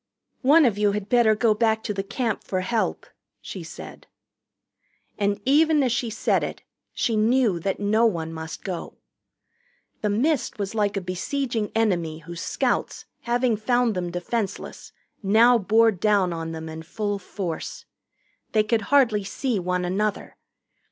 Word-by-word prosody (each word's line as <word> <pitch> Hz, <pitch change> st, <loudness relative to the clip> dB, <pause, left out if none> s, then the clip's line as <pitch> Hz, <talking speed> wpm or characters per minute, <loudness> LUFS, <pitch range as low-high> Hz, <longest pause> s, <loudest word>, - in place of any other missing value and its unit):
"One 295 Hz, +3 st, +6 dB
of 210 Hz, -4 st, +1 dB
you 205 Hz, -1 st, +3 dB
had 205 Hz, 0 st, -4 dB
better 235 Hz, -3 st, +4 dB
go 220 Hz, 0 st, +3 dB
back 220 Hz, 0 st, +1 dB
to 210 Hz, -, -2 dB
the 195 Hz, -, -2 dB
Camp 220 Hz, +2 st, -2 dB
for 185 Hz, -1 st, -2 dB
help," 220 Hz, +4 st, -1 dB, 0.3 s
she -, -, -8 dB
said. -, -, -10 dB, 1.1 s
And 200 Hz, 0 st, +1 dB
even 300 Hz, +2 st, +4 dB
as 255 Hz, -, +1 dB
she 240 Hz, 0 st, -1 dB
said 220 Hz, -, +1 dB
it -, -, -5 dB, 0.3 s
she 230 Hz, -, -1 dB
knew 220 Hz, -3 st, +2 dB
that 195 Hz, +3 st, -2 dB
no 215 Hz, +3 st, +3 dB
one 165 Hz, -6 st, -3 dB
must 160 Hz, 0 st, -7 dB
go. 180 Hz, -3 st, -5 dB, 1.0 s
The 210 Hz, -, 0 dB
mist 265 Hz, +7 st, 0 dB
was 200 Hz, 0 st, -3 dB
like 205 Hz, -2 st, 0 dB
a -, -, -1 dB
besieging 220 Hz, +5 st, -2 dB
enemy 175 Hz, -8 st, +1 dB
whose 170 Hz, +1 st, -8 dB
scouts -, -, -1 dB, 0.2 s
having 240 Hz, -1 st, +2 dB
found 240 Hz, +2 st, +1 dB
them 180 Hz, -2 st, -3 dB
defenseless 195 Hz, +4 st, -4 dB, 0.3 s
now 230 Hz, +4 st, +5 dB
bore 225 Hz, +3 st, +4 dB
down 195 Hz, -2 st, +1 dB
on 165 Hz, -1 st, -4 dB
them 160 Hz, 0 st, -6 dB
in 160 Hz, 0 st, -7 dB
full 205 Hz, +4 st, -3 dB
force. 180 Hz, -3 st, -5 dB, 0.7 s
They 215 Hz, -1 st, +4 dB
could 220 Hz, +1 st, +1 dB
hardly 240 Hz, -8 st, +4 dB
see 235 Hz, +2 st, -2 dB
one 180 Hz, 0 st, -1 dB
another. 205 Hz, +3 st, -2 dB
210 Hz, 155 wpm, -24 LUFS, 185-235 Hz, 1.1 s, One